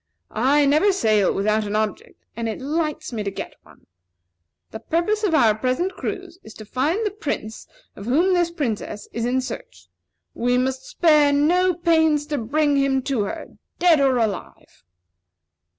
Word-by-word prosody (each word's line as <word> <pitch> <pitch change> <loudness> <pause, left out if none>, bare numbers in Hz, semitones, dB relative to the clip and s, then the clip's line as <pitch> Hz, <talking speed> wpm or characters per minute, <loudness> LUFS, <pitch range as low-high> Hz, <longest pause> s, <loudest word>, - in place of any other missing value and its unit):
I 275 +6 +3
never 305 +9 +4
sail 215 - +2
without 215 +2 0
an 205 - -3
object, 215 -1 -3
and 230 0 -3
it 220 - -5
lights 305 0 -3
me 220 - -3
to 200 - -2
get 195 - -7
one. - - -21 0.9
The 220 - -7
purpose 385 - -1
of 365 -6 +2
our 225 -8 +5
present 255 - -1
cruise 365 -2 -6
is 220 - -13
to 215 - -10
find 300 - -1
the 420 - 0
Prince 280 - -5 0.3
of 200 - -9
whom 335 +9 +3
this 350 -1 +2
Princess 245 - -4
is 230 0 -2
in 260 +1 +1
search; 255 - -9 0.4
and - - -8
we 245 +1 +3
must 260 +1 -2
spare 300 -4 +4
no 350 +5 +2
pains 320 -3 +2
to 290 - 0
bring 290 +5 +1
him 270 -1 +1
to 255 -7 -1
her, - - -8 0.2
dead 345 -4 +4
or 270 -2 +3
alive." 215 -6 -4
275 Hz, 170 wpm, -22 LUFS, 225-330 Hz, 0.9 s, our